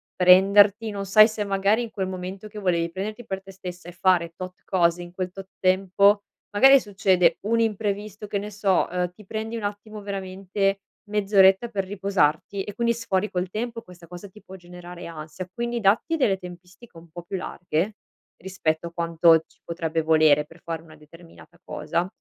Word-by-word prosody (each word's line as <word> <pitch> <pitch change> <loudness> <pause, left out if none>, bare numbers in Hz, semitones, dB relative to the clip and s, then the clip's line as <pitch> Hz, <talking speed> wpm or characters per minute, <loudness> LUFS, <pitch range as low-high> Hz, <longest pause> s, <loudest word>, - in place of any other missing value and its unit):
prenderti. 200 +4 +5
Non 200 -1 -5
sai 215 +3 +7
se 220 -2 -4
magari 200 +3 +1
in 230 - -7
quel 190 -3 -3
momento 185 +2 -6
che 210 - -12
volevi 170 -3 0
prenderti 215 +6 -5
per 190 -3 -4
te 195 - -12
stessa 180 -2 -9
e - - -7
fare 175 -1 +1
tot 185 0 -8
cose, 175 -2 +1
in 175 - -11
quel 185 0 -4
tot 190 +1 -10
tempo, 195 +2 +3 0.3
magari 270 +7 +7
succede 185 -5 +2
un 230 +3 0
imprevisto, 210 -1 -2
che 200 0 -2
ne 210 +1 -6
so, 200 -2 +1
uhm, 180 0 -2
ti 210 +3 -16
prendi 220 +3 -5
un 225 - -6
attimo, 205 +1 -6
veramente 195 0 -2 0.3
mezz'oretta 195 +1 +4
per 200 -4 -2
riposarti 195 -1 0
e 205 - -7
quindi 235 +1 +1
sfori 210 -3 -1
col 180 0 -2
tempo, 230 +3 -4
questa 180 -4 -15
cosa 180 +4 -10
ti 210 +3 -17
può 190 - -12
generare 175 -1 -11
ansia, 160 +2 -8
quindi 235 +2 -3
datti 220 +11 +2
delle 215 -11 +2
tempistiche 180 +3 -13
un 165 0 -15
po' 175 +1 -9
più 190 +2 -5
larghe 180 +3 -3 0.4
rispetto 170 -3 -2
a - - -9
quanto 165 -1 +3
ci - - -29
potrebbe 165 -1 -2
volere 155 -2 +4
per 165 +2 -18
fare 165 -1 -5
una 155 -1 -16
determinata 165 +3 -17
cosa, 170 +4 -2
190 Hz, 185 wpm, -24 LUFS, 175-205 Hz, 0.4 s, sai